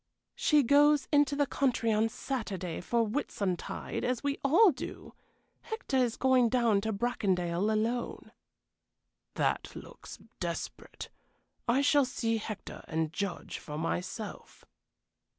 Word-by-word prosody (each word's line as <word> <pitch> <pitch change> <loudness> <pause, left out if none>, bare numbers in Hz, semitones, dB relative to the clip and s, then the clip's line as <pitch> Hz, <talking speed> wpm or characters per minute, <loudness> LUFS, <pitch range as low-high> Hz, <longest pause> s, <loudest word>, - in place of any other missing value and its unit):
"She 300 -2 +3
goes 290 +2 +5
into 290 -1 +4
the 285 0 +2
country 245 -4 +1
on 220 +1 +2
Saturday 200 - -4
for 230 +5 +1
Whitsuntide, 205 - -3
as 250 +1 -1
we 285 0 -1
all 345 +9 +6
do. 260 - -8 0.5
Hector 445 - -3
is 245 -2 +1
going 255 -2 +4
down 230 -4 +3
to 220 +2 -1
Bracondale 195 -4 0
alone." 230 +3 -2 1.0
"That - - -1
looks - - -10 0.2
desperate. - - -5 0.6
I 245 +4 +3
shall 285 -1 +4
see 230 -2 -1
Hector, 215 -1 -7
and 160 -1 -1
judge 200 -3 -4
for 150 -1 -7
myself." 180 +6 -5
235 Hz, 120 wpm, -30 LUFS, 200-275 Hz, 1.0 s, all